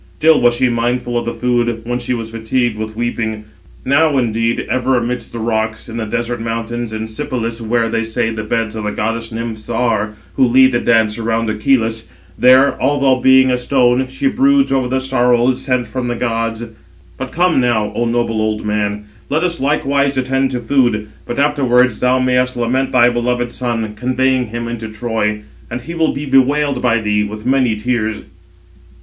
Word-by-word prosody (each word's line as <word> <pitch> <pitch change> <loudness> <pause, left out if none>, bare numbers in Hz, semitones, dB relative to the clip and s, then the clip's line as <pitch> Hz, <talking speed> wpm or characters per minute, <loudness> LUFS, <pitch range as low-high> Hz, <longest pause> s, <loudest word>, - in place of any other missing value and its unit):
Still 160 0 +4
was 120 0 +4
she 130 - +2
mindful 120 +1 -1
of 120 0 -2
food, 120 -2 0
when 120 +1 -2
she 125 +1 -2
was 115 -1 -6
fatigued 115 +1 -1
with 110 0 -6
weeping. 110 -2 -3 0.4
Now, 145 +2 +3
indeed, 115 -1 0
ever 130 0 +1
amidst 120 +1 -3
the - - -7
rocks, 110 -1 -2
in 115 0 -7
the 115 - -2
desert 120 +2 -3
mountains, 115 0 -4
in 110 0 -4
Sipylus, 115 -1 -4
where, 115 +1 0
they 115 0 -1
say, 115 +1 -1
the 110 -1 -4
beds 110 0 -2
of 110 - -4
the 105 - -2
goddess 115 +2 -3
Nymphs 110 -1 -6
are, 115 -3 0 0.2
who 130 - +4
lead 130 +2 +5
the 120 - +1
dance 110 -2 +2
around 115 0 -1
Acheloüs, 115 0 0 0.3
there, 130 +4 +4
although 140 -2 +2
being 130 0 +5
a 125 - 0
stone, 125 0 +2
she 130 - -5
broods 275 +1 +3
over 130 -2 +1
the 130 +1 0
sorrows 125 -1 +1
[sent] 125 -3 -1
from 125 +2 -4
the 120 - -2
gods. 115 -1 -2 0.5
But 130 0 -5
come 175 -3 +2
now, 110 -4 +1
O 120 - -1
noble 115 -2 0
old 110 0 -2
man, 105 0 -1 0.3
let 155 +4 0
us 175 -1 -1
likewise 140 0 +1
attend 135 +1 +1
to 125 -2 -3
food, 120 -4 +1 0.2
but 120 - -4
afterwards 130 -5 +2
thou 125 +1 +2
mayest 125 0 +1
lament 130 +3 0
thy 120 -1 +5
beloved 120 0 -1
son, 115 -4 -3
conveying 130 +1 0
him 115 +1 -5
into 115 -1 -5
Troy; 110 -1 -2 0.3
and 120 - -4
he 165 +8 -7
will 165 -1 +1
be 145 +2 -5
bewailed 135 0 +2
by 120 -2 +2
thee 105 -1 0
with 105 +1 -7
many 130 -3 +2
tears." 110 -1 -2
120 Hz, 185 wpm, -16 LUFS, 115-130 Hz, 0.5 s, lead